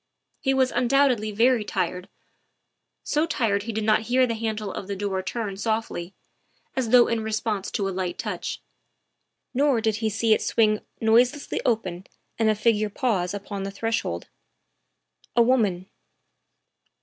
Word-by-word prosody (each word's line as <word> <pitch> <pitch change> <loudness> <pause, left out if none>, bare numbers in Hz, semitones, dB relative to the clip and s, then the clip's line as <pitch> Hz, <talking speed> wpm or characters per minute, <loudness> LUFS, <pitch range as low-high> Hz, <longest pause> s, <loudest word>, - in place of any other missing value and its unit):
He 270 -1 +1
was 260 -1 +3
undoubtedly 245 -3 +2
very 230 +2 +3
tired 180 -2 -3 0.9
so 305 +2 +1
tired 220 -10 +1
he 225 +3 -4
did 220 0 -2
not 215 0 +3
hear 255 +1 +4
the 235 - -2
handle 220 -3 -3
of 190 - -6
the 200 - -3
door 195 -1 -2
turn 200 +1 -4
softly, 215 -4 -3 0.6
as 255 -4 -1
though 245 0 +7
in 230 -1 0
response 215 -2 -2
to 200 - -1
a - - -2
light 185 -1 -3
touch; - - -4 0.9
nor 275 -2 +3
did 220 -1 0
he 220 -1 0
see 220 +1 +2
it - - +1
swing 215 -2 +2 0.2
noiselessly 240 +6 +2
open 190 -6 -1 0.3
and 220 -1 +3
a 215 - +3
figure 215 -1 +2
pause 200 -5 -1
upon 200 0 -6
the 195 - -3
threshold. 200 - -2 1.1
A 235 - +6
woman. 215 -8 +2
220 Hz, 150 wpm, -25 LUFS, 200-235 Hz, 1.1 s, though